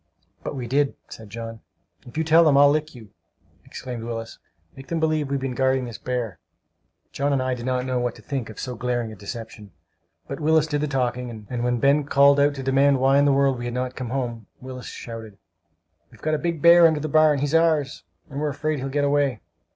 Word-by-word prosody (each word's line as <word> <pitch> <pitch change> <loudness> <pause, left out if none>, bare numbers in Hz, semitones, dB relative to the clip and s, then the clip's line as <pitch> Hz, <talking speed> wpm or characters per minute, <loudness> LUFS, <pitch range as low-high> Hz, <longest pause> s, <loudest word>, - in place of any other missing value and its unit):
"But - - -4
we 130 -3 -4
did," 140 +3 +1
said 110 -2 -11
John. 115 +1 -7 0.5
"If 120 - -11
you 160 - +1
tell 160 +1 +5
them 150 -4 +4
I'll 140 0 +7
lick 155 -1 -2
you!" 110 -5 -13 0.5
exclaimed 125 -3 -7
Willis. 115 -1 -6 0.4
"Make 135 0 -12
them 170 - -2
believe 155 -3 0
we've 140 0 -1
been 135 -1 -3
guarding 130 0 +1
this 120 -3 -8
bear!" 125 -5 -3 0.7
John 140 +1 -1
and 140 - +2
I 130 0 -1
did 120 0 -5
not 125 0 0
know 130 -1 -1
what 120 -1 -2
to - - -15
think 135 -6 -4
of 110 - -10
so 125 - -4
glaring 120 -1 -2
a - - -9
deception; 110 +1 -8 0.6
but 140 - -6
Willis 155 0 +3
did 145 -2 -2
the 150 - 0
talking; 125 -4 -3
and 120 -1 -2
when 120 0 +1
Ben 140 +3 +3
called 140 0 +5
out 145 0 +3
to 135 - -6
demand 135 +1 +3
why 135 +2 +4
in 145 - +4
the 145 - +4
world 135 -2 +2
we 120 - -5
had 120 0 -4
not 125 0 -3
come 125 -3 -5
home, 120 -4 -4
Willis 130 -1 -8
shouted: 115 -3 -8 0.7
"We've - - -19
got 155 - -1
a 155 - +1
big 170 -3 -3
bear 170 0 +8
under 160 -2 0
the 155 - -3
barn! 155 0 +4
He's 145 +2 -2
ours, 160 -4 +2 0.2
and 140 - -6
we 150 - -1
are - - 0
afraid 150 +1 -2
he'll 135 +1 -4
get 145 +1 0
away!" 140 -5 +1
135 Hz, 230 wpm, -23 LUFS, 120-145 Hz, 0.7 s, bear